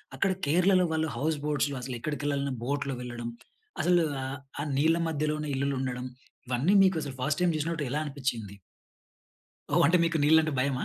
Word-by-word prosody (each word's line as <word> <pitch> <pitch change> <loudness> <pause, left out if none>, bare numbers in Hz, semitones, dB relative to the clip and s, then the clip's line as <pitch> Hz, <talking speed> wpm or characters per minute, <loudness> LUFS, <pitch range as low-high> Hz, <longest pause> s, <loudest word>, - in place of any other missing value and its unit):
అక్కడ 190 +9 +1
కేరళలో 180 +4 +4
వాళ్ళు 160 0 0
హౌస్ 155 +1 0
బోట్స్‌లో 145 -1 0
అసలు 125 0 -5
ఎక్కడికి 145 +1 -3
వెళ్ళాలన్నా 140 -1 0
బోట్‌లో 140 +1 -1
వెళ్ళడం. 120 -1 -5 0.5
అసలు 175 -1 +4 0.2
ఆహ్ 135 +1 -5 0.2
ఆ! - - -1
నీళ్ల 160 +4 +3
మధ్యలోనే 150 -1 -1
ఇల్లులు 140 +1 0
ఉండడం. 125 -1 -3 0.4
ఇవన్నీ 130 +10 +2
మీకు 190 -1 +3
అసలు 140 -2 -6
ఫస్ట్ 145 +4 0
టైమ్ 175 -2 +3
చూసినట్టు 155 0 -2
ఎలా 150 - 0
అనిపించింది? 130 -8 -3 1.2
ఓహ్! - - +5
అంటే 175 - +4
మీకు 165 -1 +1
నీళ్ళు 160 +2 +6
అంటే 155 -1 -1
భయమా? 130 -1 0
145 Hz, 170 wpm, -28 LUFS, 135-160 Hz, 1.2 s, నీళ్ళు